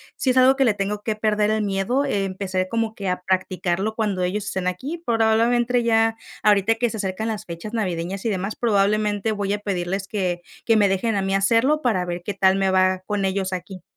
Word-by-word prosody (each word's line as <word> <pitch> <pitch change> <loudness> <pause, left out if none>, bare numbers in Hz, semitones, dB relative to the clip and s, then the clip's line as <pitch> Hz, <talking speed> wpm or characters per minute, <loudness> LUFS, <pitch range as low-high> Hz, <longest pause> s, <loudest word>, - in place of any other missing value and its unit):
sí 260 - -1
es 255 - +2
algo 260 +1 +6
que 270 - +2
le 230 -5 +3
tengo 205 +1 -2
que 215 0 -2
perder 215 -1 +1
el 215 0 0
miedo, 205 +8 0
empezaré 190 -5 -2
como 225 0 -1
que 195 -2 -3
a 180 0 -2
practicarlo 185 +2 -1
cuando 205 -5 -1
ellos 195 +3 -2
estén 190 -2 -3
aquí, 265 - -3
probablemente 235 +2 +2
ya 225 -1 +3 0.3
ahorita 210 +1 +4
que 240 +1 0
se 220 - -6
acercan 195 +2 -3
las 215 -1 -4
fechas 170 +5 -7
navideñas 185 -3 -2
y - - +2
demás, 195 +1 -2
probablemente, 210 -1 +1
voy 200 -1 -2
a 205 - -2
pedirles 195 -1 -3
que 180 -5 -2 0.2
que 225 -1 +4
me 205 -1 +4
dejen 195 +3 0
a 200 - +1
mí 195 0 -1
hacerlo 230 +10 +3
para 215 -9 +1
ver 175 0 -4
qué 205 - -3
tal 190 -1 +4
me 195 0 +1
va, 185 0 +2
con 205 -2 -1
ellos 190 0 -1
aquí. 185 0 -6
205 Hz, 215 wpm, -22 LUFS, 190-225 Hz, 0.3 s, algo